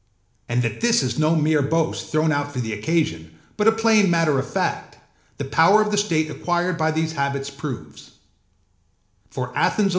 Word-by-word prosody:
And 120 +1 +1
that 115 -2 -3
this 235 0 +3
is - - -2
no 155 +2 +3
mere 155 -1 +2
boast 160 +3 -1
thrown 155 +1 +2
out 145 -1 -1
for 130 - -5
the 110 -3 -3
occasion, 105 - -2 0.2
but 225 +1 +2
plain 220 -3 +4
matter 165 -5 +2
of 130 - -5
fact, - - -3 0.4
the 140 - -4
power 165 +9 +4
of 215 0 +1
the - - +1
state 165 -7 +1
acquired 175 +2 -1
by 160 -1 0
these 160 0 -1
habits 140 -2 -3
proves. 115 - -8
155 Hz, 160 wpm, -22 LUFS, 140-175 Hz, 0.4 s, plain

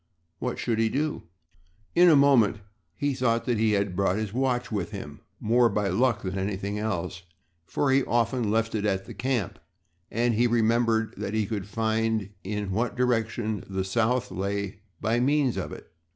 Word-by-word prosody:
What - - -2
should 115 -1 -1
he 115 0 +3
do? 150 - -2 0.7
In 175 0 +7
a 160 - +7
moment 135 -8 +5 0.4
he 145 -1 0
thought 115 -3 +1
that 120 -3 0
he 110 -1 +3
had 100 -2 0
brought 95 -1 +2
his 110 -1 -3
watch 125 -1 0
with 100 -5 -2
him - - -8 0.2
more 120 +2 +3
by 105 -3 0
luck 115 +4 +1
than 95 0 -3
anything 100 +1 -2
else, 95 -4 -3 0.5
for 140 -2 +1
he 135 0 +4
often 120 -1 +1
left 115 +1 +1
it 105 -2 -1
at 95 -2 0
the - - -9
camp 120 -6 -2 0.5
and 120 +1 +1
he 120 +3 +3
remembered 115 -1 +2
that 105 +1 -3
he 110 -1 +1
could 100 -3 -4
find 110 -1 0
in 105 0 -3
what 115 +5 -1
direction 115 -4 0
the 95 -1 -1
South 115 +4 0
lay 100 +1 -3 0.2
by 115 +2 +1
means 135 0 +2
of - - -4
it. - - -10
110 Hz, 180 wpm, -27 LUFS, 100-120 Hz, 0.7 s, In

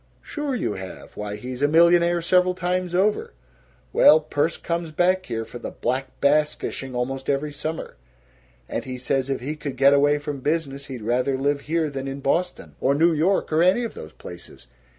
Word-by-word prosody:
"Sure 295 -3 -3
you 225 - -1
have. 95 -1 -9
Why, 105 0 -5
he's 125 +4 -7
a 145 - +4
millionaire 170 +2 +4
several 180 +1 +3
times 180 0 -1
over! 200 - +1 0.6
Well, 155 - +7
Perce 150 +1 -1
comes 170 -1 -3
back 185 +4 +1
here 115 -1 -3
for 120 - -9
the - - -5
black 130 +1 -2
bass 150 +1 +3
fishing 135 -2 -6
almost 130 +2 -3
every 145 +1 -1
summer, 155 - -5 0.7
and - - -3
he 130 -1 -6
says 130 +1 -1
if 135 - -2
he 145 +5 -3
could 140 -3 -6
get 140 +2 +6
away 145 +1 +4
from 145 -1 -5
business, 140 -1 -2
he'd 125 -5 -7
rather 125 +4 +1
live 140 +1 0
here 160 +1 0
than 135 -1 -5
in 135 +1 -5
Boston 175 +6 -1
or 140 - +3
New 165 +3 +4
York 165 +2 +1
or 155 - +4
any 185 +7 +4
of 230 - -4
those 80 0 -10
places. 85 0 -11
145 Hz, 190 wpm, -23 LUFS, 135-170 Hz, 0.7 s, Well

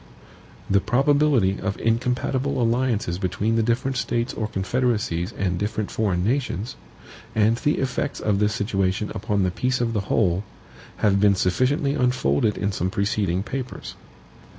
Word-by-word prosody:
The 100 0 +3
probability 135 -3 +2
of 95 +1 -2
incompatible 125 +4 0
alliances 115 -6 0
between 100 +4 0
the 115 - +3
different 120 +3 0
States 120 0 -1
or 110 - -2
confederacies 105 -4 -1
and 90 -2 -2
different 105 +1 -2
foreign 95 -5 0
nations, 120 -2 -1 0.6
and 110 +1 +4
the 150 +5 +1
effects 135 +2 -2
of 105 -2 0
this 105 +1 +1
situation 100 -1 -1
upon 105 -1 -1
the 90 - +1
peace 125 +7 0
of 115 -1 0
the 105 - 0
whole, 95 -3 +2 0.6
have 100 -1 +4
been 100 -1 +5
sufficiently 135 - +1
unfolded 110 - +1
in 100 0 -1
some 90 -1 -1
preceding 100 -2 0
papers. 130 +2 -6
110 Hz, 145 wpm, -23 LUFS, 100-125 Hz, 0.6 s, been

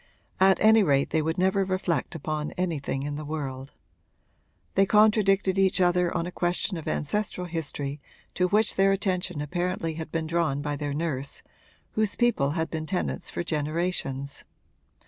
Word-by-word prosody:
At 190 0 +5
any 220 +1 +7
rate 140 -7 +2
they 160 - +2
would 160 +1 -1
never 190 +2 +2
reflect 185 -3 -1
upon 155 0 -3
anything 155 -6 -2
in 145 0 -3
the 155 - -5
world. 140 -3 -5 1.0
They 195 0 +3
contradicted 205 -3 +4
each 190 0 +3
other 180 -1 +3
on 165 - -1
a 180 - -5
question 180 +2 -1
of 160 - -7
ancestral 180 +3 -1
history 145 -4 -4 0.3
to 180 - +2
which 210 +3 +3
their 195 0 +5
attention 180 -5 -1
apparently 175 +2 -2
had 160 0 -7
been 165 -1 -1
drawn 160 -4 0
by 145 0 -2
their 145 0 -3
nurse, 145 -4 -3 0.5
whose 215 -2 +1
people 240 - +2
had 160 0 -1
been 155 -1 -4
tenants 180 +1 -2
for - - -3
generations. 150 -3 -2
170 Hz, 160 wpm, -27 LUFS, 150-190 Hz, 1.0 s, any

